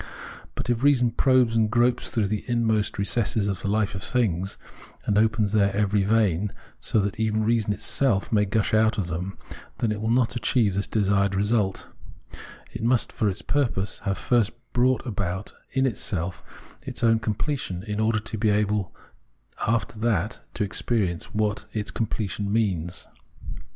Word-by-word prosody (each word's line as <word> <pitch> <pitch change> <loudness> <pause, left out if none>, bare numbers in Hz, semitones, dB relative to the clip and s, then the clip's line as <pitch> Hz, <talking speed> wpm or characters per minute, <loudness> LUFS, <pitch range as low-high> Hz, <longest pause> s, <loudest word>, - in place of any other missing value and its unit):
But - - -4
if 120 -1 0
reason 130 -4 +4
probes 125 -1 +3
and 110 -1 +3
gropes 120 +2 +2
through 110 -3 0
the 105 0 -2
inmost 110 -3 +1
recesses 105 +1 +1
of 100 -3 -2
the - - -3
hfe 105 0 +1
of 95 - -5
things, 100 -4 0 0.5
and 105 - +1
opens 110 -1 +2
their 100 -2 +3
every 105 0 +2
vein 100 -2 +2 0.3
so - - +1
that 100 +2 -3
even 110 -1 +1
reason 110 -1 +1
itself 105 0 +1
may 105 -2 +3
gush 110 +2 0
out 110 0 +3
of 90 -4 -2
them, 90 +4 -4 0.4
then 115 - 0
it 105 0 -3
will 110 - -1
not 120 0 +2
achieve 110 -3 +2
this 100 +1 -1
desired 100 -2 +1
result; 105 -1 0 0.9
it - - -5
must, 120 0 +2
for 105 - 0
its 95 - -5
purpose, 115 -8 -1
have 95 -2 -2
first 120 -5 +2 0.2
brought 125 +1 +2
about 95 -4 -3 0.2
in 135 0 +2
itself 95 -7 -2 0.4
its - - -5
own 115 -1 +4
completion 110 -3 -2
in 105 -1 -4
order 110 0 +2
to 110 0 -5
be 110 0 +2
able 105 -2 0 0.7
after 115 -1 0
that 110 -3 0 0.2
to 105 - 0
experience 100 -3 -1
what 105 -1 -1
its 105 -1 -2
completion 105 -2 -2
means. 95 -6 -1
105 Hz, 165 wpm, -25 LUFS, 100-115 Hz, 0.9 s, reason